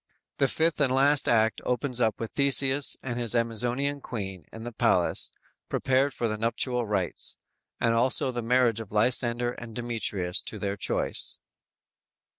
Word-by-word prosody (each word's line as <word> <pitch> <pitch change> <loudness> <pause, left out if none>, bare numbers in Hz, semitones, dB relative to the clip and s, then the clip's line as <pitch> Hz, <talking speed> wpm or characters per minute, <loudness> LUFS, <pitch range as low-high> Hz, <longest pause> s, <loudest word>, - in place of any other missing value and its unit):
The 135 - +2
fifth 160 +3 0
and 135 -3 +2
last 140 +2 +3
act 110 -1 +2
opens 125 0 -1
up 110 -2 +1
with 115 - -5
Theseus 140 0 +3
and 125 -2 -4
his 120 -2 +2
Amazonian 120 +5 0
Queen 95 - -6
in 110 - -9
the 120 - -6
palace, 110 -6 +1 0.4
prepared 135 +2 +1
for 120 -3 -2
the 110 -1 -4
nuptial 120 +1 -1
rites, 100 -4 -2 0.4
and 115 -1 +2
also 125 +2 +3
the 120 -1 -4
marriage 120 -1 +2
of 110 -3 -9
Lysander 120 +2 +2
and 120 -2 -10
Demetrius 110 -7 -2
to 110 - -6
their 100 -1 -3
choice. 100 - 0
120 Hz, 155 wpm, -27 LUFS, 110-130 Hz, 0.4 s, last